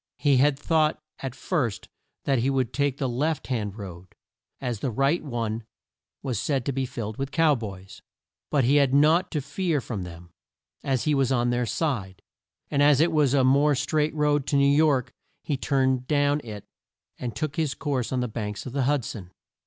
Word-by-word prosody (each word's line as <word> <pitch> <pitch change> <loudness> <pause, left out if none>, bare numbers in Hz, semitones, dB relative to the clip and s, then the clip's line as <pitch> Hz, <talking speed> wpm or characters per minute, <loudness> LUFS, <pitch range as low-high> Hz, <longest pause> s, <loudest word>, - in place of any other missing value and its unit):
He 140 -2 +3
had 140 +1 +3
thought 155 +1 +1 0.2
at 130 -2 -5
first 130 - -2 0.4
that 135 -3 +2
he 125 +4 +1
would 130 -3 0
take 140 -1 0
the 135 - -1
left 145 +5 -1
hand 110 -5 -3
road, 95 -3 -9 0.4
as 120 -5 -3
the 130 - -1
right 135 +8 +1
one 115 -5 -3 0.6
was 125 -6 -2
said 135 -2 -1
to 140 - 0
be 135 -1 -2
filled 110 -4 -5
with 135 0 -3
Cow 160 +1 +3
Boys. 100 -6 -7 0.5
But 145 -3 +2
he 135 +5 +4
had 140 -2 +3
naught 155 +5 +4
to 150 - -2
fear 155 +3 -1
from 110 -6 -5
them, 85 -1 -10 0.5
as 130 -3 0
he 150 - +2
was 135 -2 +2
on 120 -1 +2
their 120 0 0
side; 105 - -2 0.5
and 140 - +2
as 145 -1 +5
it 165 +2 +4
was 145 -4 +3
a 135 - +4
more 140 +3 +4
straight 150 +2 0
road 150 -2 +1
to 145 - 0
New 140 0 +4
York, 145 -5 +2 0.3
he 150 - -1
turned 130 -2 0
down 145 0 +2
it 105 -3 -8 0.5
and 120 -4 -4
took 150 +4 -3
his 150 -5 0
course 135 -5 -2
on 130 -1 0
the 125 - -1
banks 105 -2 -5
of 130 - -7
the 135 -2 0
Hud 140 -3 +1
son. 95 -5 -7
135 Hz, 200 wpm, -26 LUFS, 120-145 Hz, 0.6 s, as